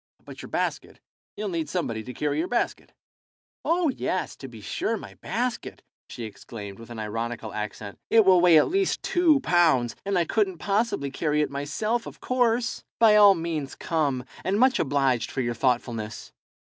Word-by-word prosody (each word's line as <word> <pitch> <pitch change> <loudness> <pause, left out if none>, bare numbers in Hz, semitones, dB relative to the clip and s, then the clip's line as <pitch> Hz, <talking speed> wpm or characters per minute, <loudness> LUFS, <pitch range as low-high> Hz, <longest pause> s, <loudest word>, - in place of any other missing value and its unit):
"But - - -10
your - - -9
basket. - - -3 0.4
You'll 210 -1 -3
need 165 -4 -3
somebody 120 -11 -2
to 125 - -6
carry 150 +2 -1
your 170 - 0
basket." 240 - -2 0.7
"Oh 335 -1 +2
yes, - - -2
to - - -8
be - - -11
sure, - - -2
my - - -10
basket," 245 +1 -3 0.3
she 120 - -7
exclaimed, 105 -2 -9
with 115 - -12
an 120 - -8
ironical 115 +1 -4
accent. 105 -1 -6
"It 225 -2 +5
will 185 -2 +6
weigh 175 -2 +7
at - - +5
least 390 +1 0
two 325 -5 +3
pounds, 160 - +3
and 195 -1 0
I 170 - +2
couldn't 195 -1 0
possibly 200 - 0
carry 150 +1 0
it 150 - -1
myself, 210 +12 -2
of - - -10
course. 245 -1 0
By 220 -2 +6
all 205 -2 +8
means 165 -5 -4
come, 145 -7 -1 0.2
and 195 +2 0
much 255 0 +4
obliged 135 -5 +1
for 135 - -2
your 120 -1 -1
thoughtfulness." 115 -3 -2
160 Hz, 175 wpm, -26 LUFS, -, 0.7 s, all